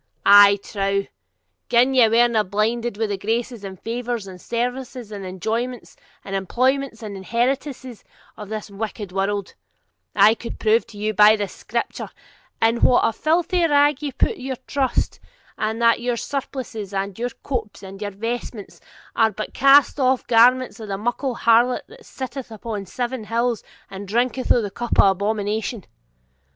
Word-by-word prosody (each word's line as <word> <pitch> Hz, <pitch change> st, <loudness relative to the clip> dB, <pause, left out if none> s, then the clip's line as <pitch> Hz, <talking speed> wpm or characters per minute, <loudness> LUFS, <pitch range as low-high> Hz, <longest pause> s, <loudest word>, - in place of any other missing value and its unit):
I 200 Hz, 0 st, +8 dB
trow, 200 Hz, -1 st, -1 dB, 0.6 s
gin 245 Hz, +3 st, +4 dB
ye 250 Hz, -3 st, +6 dB
werena 230 Hz, -1 st, +3 dB
blinded 215 Hz, +3 st, -1 dB
wi' 220 Hz, -, 0 dB
the 200 Hz, -2 st, -3 dB
graces 230 Hz, +1 st, -2 dB
and 190 Hz, -2 st, -8 dB
favours, 235 Hz, -1 st, -4 dB
and 185 Hz, -2 st, -11 dB
services 245 Hz, -1 st, -4 dB
and 200 Hz, -2 st, -6 dB
enjoyments, 220 Hz, +6 st, -4 dB, 0.3 s
and 195 Hz, -, -4 dB
employments 255 Hz, +5 st, 0 dB
and 205 Hz, -2 st, -6 dB
inheritances, 250 Hz, +4 st, -2 dB, 0.3 s
of 210 Hz, -2 st, -9 dB
this 215 Hz, -1 st, -6 dB
wicked 205 Hz, -1 st, -5 dB
world, 195 Hz, +1 st, -2 dB, 0.6 s
I 205 Hz, +2 st, +6 dB
could 230 Hz, +1 st, -8 dB
prove 220 Hz, +1 st, +2 dB
to 210 Hz, -, -13 dB
you, 215 Hz, +1 st, -1 dB
by 210 Hz, +2 st, +7 dB
the 205 Hz, -2 st, -2 dB
Scripture, -, -, -4 dB, 0.5 s
in 225 Hz, +1 st, +3 dB
what 250 Hz, -, +5 dB
a 225 Hz, -, +2 dB
filthy 340 Hz, -, +1 dB
rag 290 Hz, -1 st, +3 dB
ye 290 Hz, -2 st, -3 dB
put 265 Hz, -, 0 dB
your 260 Hz, 0 st, -4 dB
trust; 265 Hz, -3 st, -1 dB, 0.4 s
and 220 Hz, +1 st, -2 dB
that 230 Hz, 0 st, +4 dB
your 240 Hz, -1 st, -1 dB
surplices, 245 Hz, -7 st, -5 dB
and 195 Hz, 0 st, -3 dB
your 245 Hz, +1 st, -1 dB
copes 225 Hz, -7 st, -4 dB
and 195 Hz, 0 st, -9 dB
vestments, 215 Hz, +1 st, -5 dB, 0.3 s
are 225 Hz, -1 st, +4 dB
but 215 Hz, +1 st, -6 dB
cast 275 Hz, +2 st, +5 dB
off 260 Hz, -1 st, +2 dB
garments 245 Hz, +2 st, +4 dB
of 220 Hz, -, -7 dB
the 195 Hz, -1 st, -3 dB
muckle 240 Hz, +4 st, -2 dB
harlot 235 Hz, +2 st, +3 dB
that -, -, -16 dB
sitteth 260 Hz, -1 st, -7 dB
upon 215 Hz, -2 st, -6 dB
seven 245 Hz, +2 st, -4 dB
hills 230 Hz, +1 st, -1 dB, 0.2 s
and 195 Hz, +1 st, -8 dB
drinketh 245 Hz, +4 st, -1 dB
of 240 Hz, -, +4 dB
the 205 Hz, -, -4 dB
cup 240 Hz, +3 st, -3 dB
of 195 Hz, -, +7 dB
abomination. 210 Hz, +2 st, -2 dB
230 Hz, 160 wpm, -22 LUFS, 205-250 Hz, 0.6 s, I